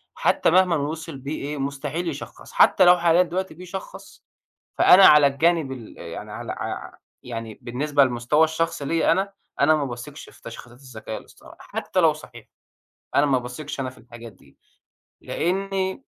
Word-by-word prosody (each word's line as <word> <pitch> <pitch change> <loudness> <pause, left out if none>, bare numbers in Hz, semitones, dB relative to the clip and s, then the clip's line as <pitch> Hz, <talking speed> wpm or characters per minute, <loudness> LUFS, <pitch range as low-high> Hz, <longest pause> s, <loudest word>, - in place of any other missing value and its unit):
حتى - - +2
مهما 180 -1 +4
وصَل 155 0 -4
بيه 140 +4 -6
إيه، 145 +1 -4
مستحيل 140 +5 -4
يشخّص، 145 -2 -9
حتى 185 - +5
لو 180 0 +7
حاليًا 170 +1 +4
دلوقتي 185 +1 -4
بيشخّص، 180 +3 -10 0.5
فأنا 190 +1 +8
على 150 -1 +8
الجانب 155 0 +1
ال 120 -4 -10
يعني - - -8
على - - -6
ع - - -6 0.3
يعني 115 -3 -7
بالنسبة 140 +4 +1
للمستوى 125 +5 +2
الشخصي 160 -2 -2
ليا، 165 +3 +2
أنا 195 +1 0 0.3
أنا 155 +2 +5
ما 145 -2 -1
باثقش 125 +4 -8
في - - -20
تشخيصات 120 +1 -11
الذكاء 115 -5 -8
الاصطناعي، - - -17
حتى - - -3
لو - - +5
صحيح، - - -13 0.7
أنا 140 - +4
ما 135 -2 +2
باثقش 125 +4 -7
أنا 130 - -2
في 130 - -17
الحاجات 120 -1 -12
دي، 70 -7 -24 0.6
لأني 190 +4 -2
145 Hz, 160 wpm, -23 LUFS, 125-170 Hz, 0.7 s, فأنا